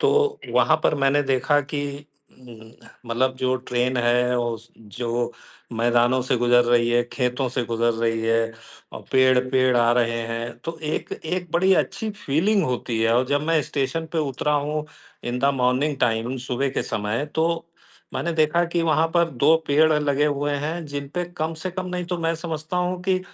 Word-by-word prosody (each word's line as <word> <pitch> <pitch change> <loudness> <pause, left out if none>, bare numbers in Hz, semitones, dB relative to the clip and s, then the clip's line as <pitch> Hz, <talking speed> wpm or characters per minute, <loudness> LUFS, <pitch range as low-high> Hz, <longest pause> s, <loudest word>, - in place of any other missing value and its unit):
तो 435 0 +2
वहाँ - - +4
पर - - +3
मैंने 140 +1 +2
देखा 135 +2 +2
कि 145 0 -5 0.3
उम, 115 -3 -13 0.4
मतलब 130 +3 0
जो 130 0 0
ट्रेन 125 0 -1
है, 125 +1 +2
ओस 115 -1 -3
जो 120 +3 -3 0.4
मैदानों 120 +2 +2
से 130 - 0
गुज़र 120 0 +4
रही 120 -1 +3
है, 120 0 +3
खेतों 125 0 -1
से 125 0 -2
गुज़र 115 0 +1
रही 115 0 0
है, 115 0 +2 0.5
और - - -8
पेड़ 130 -1 +5
पेड़ 130 -1 +3
आ 120 0 +4
रहे 115 -1 +1
हैं, 115 +1 -3
तो 165 0 -4
एक 155 0 -3
एक 175 +1 -4
बड़ी 185 +3 +4
अच्छी 220 -1 -5
फ़ीलिंग 195 +2 +1
होती 125 -2 -2
है, 115 0 +3
और 125 +1 +2
जब 145 +2 0
मैं 165 -1 +3
स्टेशन 145 +4 -2
पे 165 - 0
उतरा 140 +3 -1
हूँ, 150 +1 -1 0.4
इन 120 +1 -2
द 140 +2 +3
मॉर्निंग 130 +4 +1
टाइम, 115 +2 0
सुबह 135 +3 0
के - - -2
समय, 105 +6 -2
तो 165 +1 0 0.5
मैंने 170 - -1
देखा 160 +2 +2
कि 170 - +2
वहाँ 160 0 +3
पर 170 -1 +3
2 145 +5 +4
पेड़ 155 +2 +4
लगे 145 -1 +1
हुए 145 0 -1
हैं, 165 +2 -4
जिन 145 -1 -5
पे 180 0 -1
कम 160 +1 -2
से 185 - -2
कम, 185 0 -5
नहीं 180 -1 -3
तो 175 - -4
मैं 165 0 0
समझता 160 0 -5
हूँ 180 0 -1
कि 185 0 +1
135 Hz, 190 wpm, -23 LUFS, 120-160 Hz, 0.5 s, पेड़